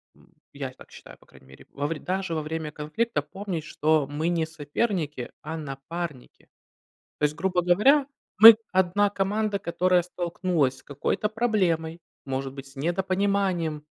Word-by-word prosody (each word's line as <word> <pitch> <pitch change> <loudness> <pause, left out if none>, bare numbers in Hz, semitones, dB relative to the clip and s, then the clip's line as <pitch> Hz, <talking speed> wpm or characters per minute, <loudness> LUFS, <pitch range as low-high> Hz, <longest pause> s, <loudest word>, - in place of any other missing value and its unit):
м, - - -24 0.2
я - - -5
так - - -17
считаю, - - -13
по - - -23
крайней 65 - -20
мере- 65 - -16
во 145 +1 -2
вре 165 -1 -4
даже 185 -2 -2
во 155 - -1
время 155 0 -4
конфликта 155 +11 -2
помнить, 190 -5 -5
что 155 -1 +1
мы 155 +3 -2
не 165 -2 +1
соперники, 155 - -3
а 160 +2 -5
напарники. 150 0 -7 0.7
То - - -6
есть, 150 +1 -1
грубо 180 +1 0
говоря, 260 - +4 0.3
мы 225 +1 +12 0.2
одна 190 +2 +2
команда, 205 +1 -1
которая 180 0 +2
столкнулась 170 -5 -1
с - - -17
какой-то 145 +9 -2
проблемой, 185 -8 0 0.3
может 135 0 -3
быть, 135 0 -9
с 135 - -17
недопониманием 185 0 0
170 Hz, 155 wpm, -26 LUFS, 150-195 Hz, 0.7 s, мы